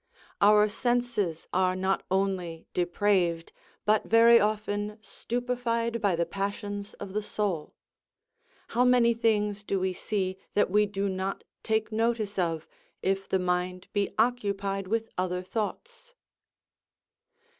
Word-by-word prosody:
Our 210 +1 +6
senses 235 -6 -1
are 185 0 +2
not 190 +1 0
only 185 -4 -1
depraved, 175 -2 +1 0.3
but 215 0 +3
very 230 +1 +7
often 210 0 -1
stupefied 235 0 -2
by 200 -4 +2
the 170 0 0
passions 200 +2 -4
of 195 -2 -8
the 210 - 0
soul; 200 -6 -3 0.9
how 240 +2 +2
many 245 -2 +5
things 210 -3 +1
do 195 -1 -1
we 185 0 0
see 190 -1 -2 0.2
that 205 - +3
we 210 +1 +4
do 200 0 -2
not 190 0 -3 0.2
take 220 0 0
notice 220 -2 0
of, 165 -3 -1 0.4
if 195 0 0
the 190 - +3
mind 180 0 -2
be 205 -1 +1
occupied 200 -4 0
with 225 +2 -1
other 180 0 -1
thoughts? 465 - -5
205 Hz, 125 wpm, -28 LUFS, 185-225 Hz, 0.9 s, very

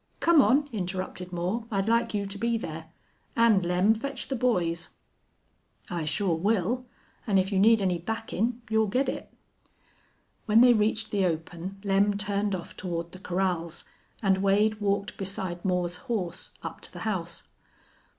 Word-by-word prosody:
Come 335 -3 +6
on," 285 +3 +3
interrupted 185 -2 -4
Moore. 185 +7 -2
"I'd 195 -2 0
like 230 0 +2
you 200 -1 0
to 200 +1 -7
be 235 +1 +1
there. 160 -6 -6 0.5
And, 230 -5 +5
Lem, 180 +5 +3
fetch 265 +3 -5
the 270 - 0
boys." 175 -9 0 1.0
"I 170 -3 -2
shore 170 +1 0
will, 225 +6 0 0.4
an' 200 -3 +3
if 190 +1 +1
you 195 - +2
need 220 +1 +5
any 180 -2 +1
backin' 225 +4 -2
you'll 220 0 +2
git 255 +7 +1
it." - - -4 1.2
When 220 +2 +6
they 245 0 +8
reached 215 0 +1
the 200 -2 +2
open 175 +3 -4
Lem 200 +1 +2
turned 205 0 0
off 175 - -8
toward 170 -2 -4
the 185 - -11
corrals, 180 -3 -2 0.4
and 190 -1 +3
Wade 210 +2 +2
walked 200 0 0
beside 190 -2 -3
Moore's 180 -2 0
horse 215 -9 -4
up - - -6
to - - -9
the - - -9
house. 175 -6 -3
200 Hz, 160 wpm, -28 LUFS, 180-225 Hz, 1.2 s, they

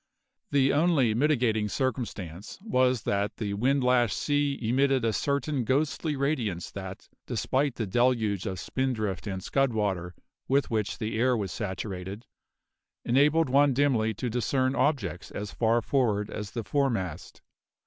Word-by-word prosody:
The 135 -1 +3
only 145 -7 +3
mitigating 115 -5 +1
circumstance 105 - -4
was 130 - +2
that 100 +1 -1
the 105 -2 -2
wind 130 +6 +1
lashed 125 -4 +3
sea 145 -1 0
emitted 130 +2 +2
a 110 - +1
certain 140 +2 0
ghostly 145 +4 0
radiance 130 - -1
that, 95 -1 -8 0.2
despite 135 0 0
the 115 - -2
deluge 110 -2 +1
of 95 -2 -4
spindrift 110 -8 -2
and 95 -2 -4
scud 135 -3 +1
water 95 -5 -2 0.3
with 135 -1 +1
which 110 -2 -1
the 110 -1 -3
air 125 0 +3
was 100 -4 -3
saturated, 95 +1 -5 0.8
enabled 145 +5 +3
one 140 0 +4
dimly 120 -6 +2
to 125 - -3
discern 130 +3 0
objects 115 - 0
as 105 0 -6
far 115 0 +1
forward 110 -7 +1
as 105 -1 -5
the 115 +2 -4
foremast. 100 - -2
120 Hz, 140 wpm, -28 LUFS, 105-135 Hz, 0.8 s, one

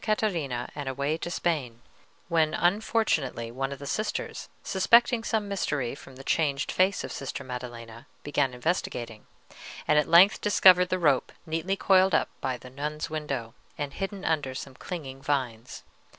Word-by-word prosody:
Catarina 165 - -1
and 145 -2 -4
away 140 +3 -1
to 175 - -5
Spain, 140 -10 -2 0.5
when 160 -2 +2
unfortunately 175 - +1
one 135 +3 -3
of 140 - -5
the 140 - -9
sisters, 215 +9 -3
suspecting 230 +4 +4
some 220 -3 -1
mystery, 145 -11 -1
from 135 -1 -12
the 135 - -11
changed 140 -2 0
face 185 +1 +2
of - - -6
Sister 140 0 -5
Maddelena, 120 -2 -8 0.2
began 145 -3 0
investigating, 125 -6 -3 0.6
and 150 - +5
at 150 - 0
length 175 +5 +7
discovered 185 -3 +6
the 185 - +1
rope 145 -7 +2
neatly 165 +4 -1
coiled 190 -2 +4
up - - +2
by 130 -2 -1
the 125 +1 -13
nun's 150 +3 -4
window, 140 -7 -3 0.2
and 145 -1 -4
hidden 195 0 -5
under 145 -5 0
some 135 0 -7
clinging 135 -3 -7
vines. 130 -5 -3
145 Hz, 155 wpm, -27 LUFS, 130-180 Hz, 0.6 s, length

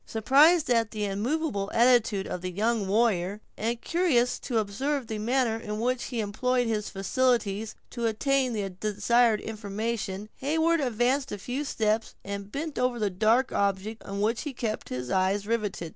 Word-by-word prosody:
Surprised 285 +9 +4
at 230 -2 +3
the 210 -2 -3
immovable 205 +1 -1
attitude 230 -4 +4
of 180 - -5
the 185 - -3
young 215 +2 0
warrior, 205 -2 +1 0.2
and 230 +2 -2
curious 305 -9 +1
to 240 - -2
observe 255 +7 -1
the 220 -1 -4
manner 235 0 +1
in 210 -1 -5
which 250 +2 0
he 245 -3 -4
employed 245 +4 0
his 215 -2 -1
faculties 215 0 0 0.2
to 235 -2 -1
obtain 260 +4 +1
the 205 -3 -2
desired 215 +4 +2
information, 210 -1 -4
Heyward 320 +4 +2
advanced 255 +2 +1
a 205 - -3
few 250 +8 -3
steps, 220 -5 -1
and 200 0 -6
bent 305 +1 -4
over 250 -1 +1
the 210 -3 0
dark 225 +7 +2
object 200 +2 -1
on 200 0 -4
which 220 +2 +1
he 300 - -4
had 265 - -10
kept 220 -2 -3
his 125 0 -4
eye 190 +2 +2
riveted. 210 -6 -2
225 Hz, 170 wpm, -27 LUFS, 205-250 Hz, 0.2 s, Surprised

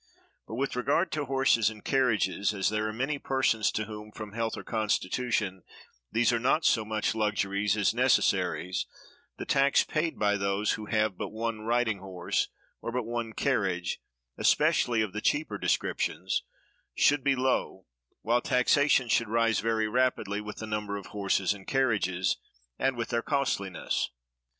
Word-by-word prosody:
But 110 - -6
with 135 +2 -2
regard 145 +8 +1
to 150 -2 -2
horses 135 -4 +3
and 110 -1 -12
carriages, 105 -6 +1
as 95 - +1
there 110 0 -1
are - - -2
many 135 +6 -2
persons 130 -6 +1
to 110 - -1
whom, 105 0 -9
from 105 -1 -8
health 115 0 -2
or - - -7
constitution, 110 -2 -1 0.5
these 120 +1 +3
are 120 - +1
not 135 +7 +2
so 110 - +4
much 110 0 -1
luxuries 105 -2 0
as 105 - +2
necessaries, 95 -7 +1 0.5
the - - -5
tax 140 0 +3
paid 160 +1 -2
by 105 -1 +2
those 100 +2 0
who 105 -1 -4
have 110 -3 0
but - - -2
one 110 0 -3
riding 115 -2 +1
horse, 95 -2 -2 0.3
or 115 - -4
but 125 0 -1
one 120 -1 -3
carriage, 95 -10 0 0.4
especially 115 -2 +3
of 100 -3 -5
the 105 - -3
cheaper 150 +7 0
descriptions, - - 0 0.5
should 145 -2 +3
be 140 -1 +3
low; 130 -7 -1 0.4
while 120 +2 +2
taxation 130 +1 +3
should 115 -1 +1
rise 115 -1 +2
very 110 +1 0
rapidly 110 -4 0
with 105 0 -8
the 110 - -5
number 105 -1 -3
of 100 - -8
horses 100 -1 +1
and 95 -2 -13
carriages, 105 -9 +1 0.4
and 135 -1 +1
with 120 - -3
their 115 -1 0
costliness. 115 - -1
110 Hz, 160 wpm, -29 LUFS, 105-125 Hz, 0.5 s, so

